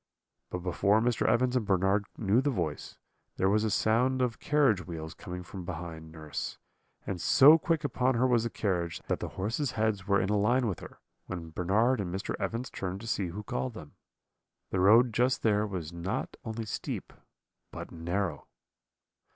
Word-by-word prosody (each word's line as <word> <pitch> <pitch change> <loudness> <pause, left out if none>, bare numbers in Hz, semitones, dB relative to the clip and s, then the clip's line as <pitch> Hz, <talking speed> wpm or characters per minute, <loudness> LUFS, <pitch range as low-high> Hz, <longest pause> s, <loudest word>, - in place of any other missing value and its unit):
"But 90 -1 -5
before 100 +4 +2
Mr. 120 +1 +1
Evans 125 +2 +2
and 125 - +2
Bernard 95 +1 +2
knew 110 +3 +3
the 145 - +1
voice, 85 - -3 0.4
there 95 +1 +2
was 105 +1 +2
a 110 - +1
sound 120 +6 +2
of 125 -2 0
carriage 135 - +2
wheels 80 -2 -6
coming 90 0 -7
from 90 +1 -8
behind 85 -2 -7
nurse; 80 -2 -5 0.5
and 90 -4 -4
so 150 +4 +7
quick 165 0 0
upon 130 -2 +1
her 125 +2 +3
was 120 -3 +3
the 115 - -1
carriage, 90 -7 -2
that - - -1
the - - -4
horses' 115 +8 -1
heads 110 -3 0
were 100 0 +4
in 95 - 0
a 105 - +2
line 120 +5 +3
with 100 -6 -2
her, - - -12 0.3
when 85 -3 -6
Bernard 105 +9 +2
and 90 -3 -4
Mr. 95 +3 -3
Evans 120 +3 -3
turned 95 0 -4
to 115 - -8
see 100 -4 0
who 100 +5 -6
called 120 +2 -3
them. 75 -7 -10 0.8
The 95 - 0
road 110 +5 +6
just 125 +4 +1
there 105 -1 +2
was 85 -5 -5
not 85 +4 -3
only 110 0 -4
steep 105 - -5 0.6
but - - -8
narrow. 85 +2 -3
105 Hz, 185 wpm, -30 LUFS, 90-120 Hz, 0.8 s, so